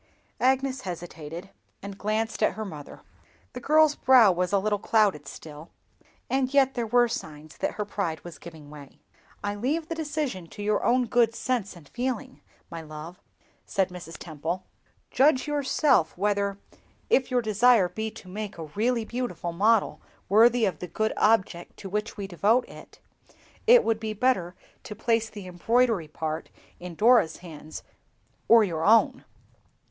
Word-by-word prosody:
Agnes 265 Hz, 0 st, +1 dB
hesitated, 175 Hz, -1 st, -8 dB, 0.3 s
and 200 Hz, 0 st, -7 dB
glanced 215 Hz, +3 st, -2 dB
at 215 Hz, -, +3 dB
her 220 Hz, -, -5 dB
mother. 150 Hz, -7 st, -10 dB, 0.5 s
The 250 Hz, -, -6 dB
girl's 310 Hz, +3 st, +4 dB
brow 255 Hz, -8 st, +6 dB
was 180 Hz, 0 st, -1 dB
a 200 Hz, -, +3 dB
little 205 Hz, +1 st, 0 dB
clouded 200 Hz, -11 st, +1 dB
still, 150 Hz, +2 st, -10 dB, 0.6 s
and 265 Hz, -1 st, 0 dB
yet 270 Hz, -1 st, +3 dB
there 235 Hz, -2 st, -2 dB
were 240 Hz, +2 st, +4 dB
signs 155 Hz, -8 st, -7 dB
that -, -, -2 dB
her 210 Hz, -, -4 dB
pride 170 Hz, -7 st, -3 dB
was 175 Hz, -2 st, -10 dB
giving 160 Hz, -4 st, -12 dB
way. 145 Hz, -2 st, -13 dB, 0.5 s
"I 205 Hz, 0 st, -1 dB
leave 290 Hz, +10 st, -2 dB
the -, -, -1 dB
decision 300 Hz, -, -3 dB
to 205 Hz, +4 st, -9 dB
your 210 Hz, 0 st, 0 dB
own 250 Hz, +1 st, +3 dB
good 230 Hz, -1 st, +2 dB
sense 235 Hz, -8 st, -2 dB
and 165 Hz, -5 st, -15 dB
feeling, 255 Hz, -, -4 dB, 0.3 s
my 165 Hz, -1 st, -6 dB
love," 155 Hz, +3 st, -10 dB, 0.5 s
said 190 Hz, -1 st, 0 dB
Mrs. 175 Hz, -2 st, -9 dB
Temple. 165 Hz, +3 st, -5 dB, 0.5 s
"Judge 265 Hz, 0 st, +3 dB
yourself 280 Hz, -, +1 dB
whether, 200 Hz, 0 st, 0 dB, 0.5 s
if 260 Hz, -1 st, +3 dB
your 250 Hz, -2 st, +1 dB
desire 220 Hz, -1 st, +4 dB
be 220 Hz, +4 st, -4 dB
to 220 Hz, -3 st, -13 dB
make 210 Hz, +1 st, -6 dB
a 165 Hz, -, -6 dB
really 230 Hz, +3 st, 0 dB
beautiful 240 Hz, -8 st, -4 dB
model 210 Hz, +4 st, +2 dB, 0.3 s
worthy 230 Hz, +3 st, +5 dB
of 180 Hz, -6 st, -2 dB
the 180 Hz, -, -6 dB
good 220 Hz, +3 st, -1 dB
object 190 Hz, -5 st, +1 dB
to 195 Hz, -, -8 dB
which 210 Hz, +3 st, -3 dB
we 200 Hz, -, -4 dB
devote 205 Hz, +7 st, +1 dB
it, -, -, -14 dB, 0.7 s
it 485 Hz, +1 st, +7 dB
would 225 Hz, -1 st, 0 dB
be 220 Hz, -1 st, -4 dB
better 195 Hz, -6 st, 0 dB, 0.3 s
to 210 Hz, -, -9 dB
place 225 Hz, +1 st, 0 dB
the 205 Hz, -3 st, -10 dB
embroidery 215 Hz, +1 st, +1 dB
part 155 Hz, +1 st, -5 dB, 0.3 s
in 175 Hz, -1 st, -8 dB
Dora's 220 Hz, -5 st, +4 dB
hands 155 Hz, -2 st, -10 dB, 0.6 s
or 230 Hz, -1 st, +7 dB
your 165 Hz, -5 st, -2 dB
own." 225 Hz, +4 st, +4 dB
210 Hz, 160 wpm, -26 LUFS, 175-245 Hz, 0.7 s, it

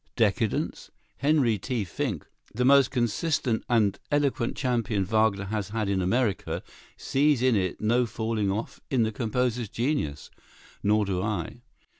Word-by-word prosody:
Decadence? 110 Hz, -1 st, 0 dB, 0.3 s
Henry 140 Hz, -6 st, +2 dB
T. 120 Hz, +1 st, -2 dB
Finck, 105 Hz, -, -3 dB, 0.3 s
the 125 Hz, +2 st, +1 dB
most 140 Hz, -1 st, +6 dB
consistent 120 Hz, 0 st, 0 dB
and 110 Hz, -5 st, +2 dB
eloquent 145 Hz, -4 st, 0 dB
champion 115 Hz, -6 st, 0 dB
Wagner 110 Hz, -1 st, +2 dB
has 105 Hz, -1 st, -3 dB
had 110 Hz, -1 st, -2 dB
in 95 Hz, -1 st, +1 dB
America, 105 Hz, +2 st, 0 dB, 0.3 s
sees 140 Hz, -2 st, +2 dB
in 130 Hz, -3 st, +4 dB
it 95 Hz, -3 st, -1 dB
no 120 Hz, +3 st, +2 dB
falling 110 Hz, -2 st, -1 dB
off 105 Hz, +4 st, -4 dB
in 125 Hz, -4 st, +2 dB
the 110 Hz, -, 0 dB
composer's 120 Hz, 0 st, -1 dB
genius; 120 Hz, -, -2 dB, 0.5 s
nor 105 Hz, +1 st, +2 dB
do 95 Hz, -2 st, -1 dB
I. 105 Hz, +2 st, -3 dB
115 Hz, 140 wpm, -27 LUFS, 105-125 Hz, 0.5 s, most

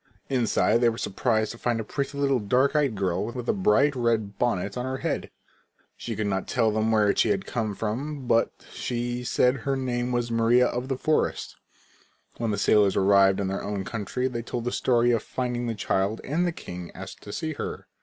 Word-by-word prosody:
Inside 120 Hz, -2 st, +2 dB
they 120 Hz, -, +5 dB
were 115 Hz, -, -4 dB
surprised 110 Hz, +1 st, 0 dB
to 115 Hz, -, -11 dB
find 120 Hz, -2 st, 0 dB
a -, -, -2 dB
pretty 140 Hz, +5 st, -4 dB
little 140 Hz, -2 st, +2 dB
dark 125 Hz, +8 st, +2 dB
eyed 140 Hz, -7 st, +2 dB
girl 95 Hz, -2 st, 0 dB
with 120 Hz, +1 st, -6 dB
a -, -, +3 dB
bright 130 Hz, +9 st, +3 dB
red 115 Hz, -5 st, 0 dB
bonnet 100 Hz, -5 st, 0 dB
on 125 Hz, -, -2 dB
her 130 Hz, +1 st, -3 dB
head. -, -, -2 dB, 0.7 s
She -, -, -5 dB
could 110 Hz, -, -2 dB
not 95 Hz, -2 st, -1 dB
tell 115 Hz, -3 st, +2 dB
them 110 Hz, +1 st, +1 dB
where 105 Hz, -2 st, +3 dB
she -, -, +3 dB
had 195 Hz, -2 st, 0 dB
come 110 Hz, -4 st, -2 dB
from 130 Hz, +7 st, -3 dB
but 115 Hz, -1 st, +3 dB, 0.2 s
she 120 Hz, 0 st, -3 dB
said 125 Hz, +1 st, +2 dB
her 135 Hz, +3 st, -1 dB
name 125 Hz, -2 st, -2 dB
was 120 Hz, -1 st, -1 dB
Maria 115 Hz, +2 st, +4 dB
of 125 Hz, +1 st, -2 dB
the 135 Hz, -1 st, -2 dB
forest. 155 Hz, +3 st, 0 dB, 0.8 s
When 115 Hz, -1 st, -1 dB
the 105 Hz, -, 0 dB
sailors 105 Hz, -2 st, +4 dB
arrived 95 Hz, 0 st, +4 dB
in 100 Hz, -, 0 dB
their 95 Hz, +1 st, -2 dB
own 100 Hz, -1 st, -3 dB
country 115 Hz, +4 st, -2 dB
they 120 Hz, -2 st, -3 dB
told 120 Hz, 0 st, -4 dB
the 125 Hz, -, -1 dB
story 120 Hz, -1 st, +2 dB
of 115 Hz, -2 st, +2 dB
finding 125 Hz, 0 st, -3 dB
the 115 Hz, -, -2 dB
child 100 Hz, +1 st, 0 dB
and 170 Hz, +6 st, 0 dB
the -, -, 0 dB
king 90 Hz, -, -8 dB
asked -, -, -9 dB
to 100 Hz, -, -9 dB
see 155 Hz, +7 st, -3 dB
her. -, -, -5 dB
120 Hz, 210 wpm, -26 LUFS, 105-125 Hz, 0.8 s, they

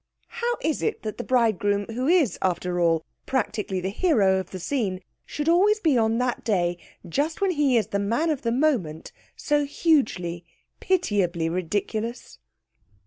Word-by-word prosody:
How 480 Hz, 0 st, -2 dB
is 315 Hz, -1 st, -1 dB
it -, -, -2 dB
that 215 Hz, +1 st, -5 dB
the -, -, -2 dB
bridegroom, 205 Hz, -5 st, +1 dB
who 255 Hz, +3 st, -2 dB
is, 320 Hz, -, +3 dB
after 180 Hz, -1 st, -1 dB
all, 165 Hz, -2 st, +2 dB, 0.2 s
practically 215 Hz, -6 st, -1 dB
the 185 Hz, +1 st, -2 dB
hero 205 Hz, -, +3 dB
of 190 Hz, -1 st, -6 dB
the 185 Hz, -, -7 dB
scene, 195 Hz, -3 st, -2 dB, 0.3 s
should 300 Hz, +1 st, -4 dB
always 395 Hz, +6 st, +4 dB
be 315 Hz, -9 st, +2 dB
on 225 Hz, -1 st, +2 dB
that 250 Hz, -1 st, -1 dB
day, 175 Hz, -5 st, 0 dB, 0.3 s
just 290 Hz, -, -1 dB
when 395 Hz, -2 st, +2 dB
he 290 Hz, -6 st, +2 dB
is 220 Hz, -, +2 dB
the 200 Hz, -, -2 dB
man 235 Hz, +11 st, 0 dB
of 290 Hz, -, -2 dB
the 230 Hz, -, -1 dB
moment, 235 Hz, -, 0 dB, 0.2 s
so 295 Hz, -1 st, +1 dB
hugely, 215 Hz, -, 0 dB, 0.4 s
pitiably 195 Hz, -, 0 dB
ridiculous? 205 Hz, +7 st, -3 dB
225 Hz, 160 wpm, -25 LUFS, 185-295 Hz, 0.4 s, always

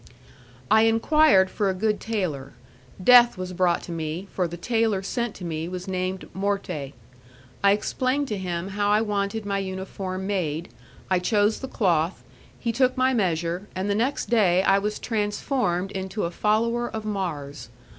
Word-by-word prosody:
I 220 Hz, +1 st, +6 dB
enquired 225 Hz, -4 st, +4 dB
for 205 Hz, -2 st, 0 dB
a 190 Hz, -, -1 dB
good 210 Hz, +2 st, 0 dB
tailor: 170 Hz, -12 st, -3 dB, 0.5 s
death 240 Hz, 0 st, +7 dB
was 185 Hz, 0 st, -5 dB
brought 180 Hz, -1 st, +1 dB
to -, -, -8 dB
me, 165 Hz, +3 st, -4 dB
for 180 Hz, -2 st, 0 dB
the 170 Hz, +1 st, -7 dB
tailor 225 Hz, 0 st, 0 dB
sent 235 Hz, +2 st, -2 dB
to 180 Hz, -, -8 dB
me 160 Hz, -1 st, -3 dB
was 180 Hz, 0 st, -6 dB
named 185 Hz, 0 st, -3 dB
Morte. 190 Hz, -8 st, -2 dB, 0.7 s
I 200 Hz, -, +6 dB
explained 255 Hz, +7 st, 0 dB
to 210 Hz, -, -2 dB
him 180 Hz, 0 st, -3 dB
how 205 Hz, +1 st, 0 dB
I 210 Hz, +1 st, +4 dB
wanted 210 Hz, 0 st, -2 dB
my 200 Hz, -1 st, -1 dB
uniform 190 Hz, 0 st, -5 dB
made, 170 Hz, -5 st, -2 dB, 0.4 s
I 185 Hz, -, +4 dB
chose 205 Hz, +3 st, +2 dB
the 265 Hz, -, -5 dB
cloth, 170 Hz, -, 0 dB, 0.4 s
he 235 Hz, -, -1 dB
took 255 Hz, +2 st, +2 dB
my 260 Hz, +1 st, +3 dB
measure, 175 Hz, -3 st, -1 dB
and 190 Hz, +2 st, -1 dB
the -, -, +3 dB
next 235 Hz, +4 st, -1 dB
day 190 Hz, -5 st, +4 dB
I 195 Hz, 0 st, +4 dB
was 210 Hz, +1 st, -2 dB
transformed 205 Hz, -3 st, -1 dB
into 190 Hz, +2 st, -4 dB
a 170 Hz, -, -1 dB
follower 230 Hz, +5 st, +1 dB
of 220 Hz, -1 st, -6 dB
Mars. 150 Hz, -, -4 dB
195 Hz, 165 wpm, -25 LUFS, 180-220 Hz, 0.7 s, death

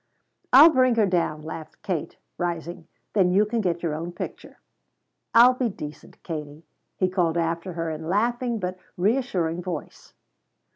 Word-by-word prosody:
"I'll 295 Hz, +6 st, +9 dB
bring 255 Hz, -4 st, +3 dB
her 220 Hz, -2 st, +4 dB
down," 170 Hz, -5 st, 0 dB
laughed 155 Hz, 0 st, -9 dB
Kate, 175 Hz, -6 st, -3 dB, 0.2 s
rising; 170 Hz, -1 st, -4 dB, 0.3 s
"then 190 Hz, -4 st, +4 dB
you 195 Hz, +4 st, +4 dB
can 225 Hz, +2 st, -1 dB
get 175 Hz, -3 st, -1 dB
your 165 Hz, -3 st, -1 dB
own 170 Hz, +3 st, -5 dB
picture." -, -, -8 dB, 0.8 s
"I'll 245 Hz, +2 st, +8 dB
be 250 Hz, -2 st, -1 dB
decent, 150 Hz, -6 st, -10 dB
Katie," 155 Hz, -1 st, -7 dB, 0.3 s
he 185 Hz, -, +2 dB
called 175 Hz, -3 st, 0 dB
after 170 Hz, +2 st, -2 dB
her 165 Hz, -1 st, -3 dB
in 160 Hz, +1 st, -6 dB
laughing 240 Hz, +4 st, 0 dB
but 185 Hz, -2 st, -4 dB, 0.2 s
reassuring 180 Hz, -5 st, 0 dB
voice. 175 Hz, -4 st, -7 dB
180 Hz, 150 wpm, -25 LUFS, 165-215 Hz, 0.8 s, I'll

